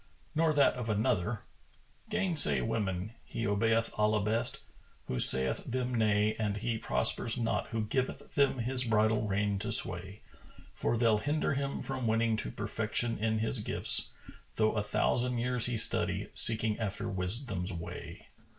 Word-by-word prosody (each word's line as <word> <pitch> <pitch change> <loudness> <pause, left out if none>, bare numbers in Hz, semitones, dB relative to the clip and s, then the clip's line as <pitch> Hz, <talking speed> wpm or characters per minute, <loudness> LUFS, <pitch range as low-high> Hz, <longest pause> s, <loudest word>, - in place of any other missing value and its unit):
Nor 160 0 +2
that 145 -2 +4
of 125 -3 -5
another,[FN#430] 110 - -4
"Gainsay 170 - +4
women; 95 - -2
he 115 - -5
obeyeth 115 +2 +1
Allah 105 -1 +2
best, 115 +3 -1 0.4
who 65 - -3
saith 65 +1 +2
them 125 0 -3
nay 110 -2 +2
And 105 -2 -1
he 110 +1 -2
prospers 65 - 0
not 115 -1 -1
who 115 -1 -2
giveth 130 +5 -3
them 140 -2 +2
his 125 +2 -1
bridle 110 -1 +2
rein 100 0 0
to 115 +3 -3
sway; 95 -1 0 0.5
For 120 - -1
they'll 110 -2 +3
hinder 145 +5 0
him 140 0 -2
from 130 -3 -3
winning 115 0 +2
to - - -4
perfection 110 - -2
in 110 0 0
his 115 - 0
gifts, 105 - +2 0.5
Though 110 0 +2
a 105 - 0
thousand 125 +4 0
years 125 0 +2
he 120 -2 -1
study, - - +1
seeking 110 -1 +1
after 105 0 -3
wisdom's 95 0 -1
way." 85 -2 -8
110 Hz, 150 wpm, -31 LUFS, 105-125 Hz, 0.5 s, that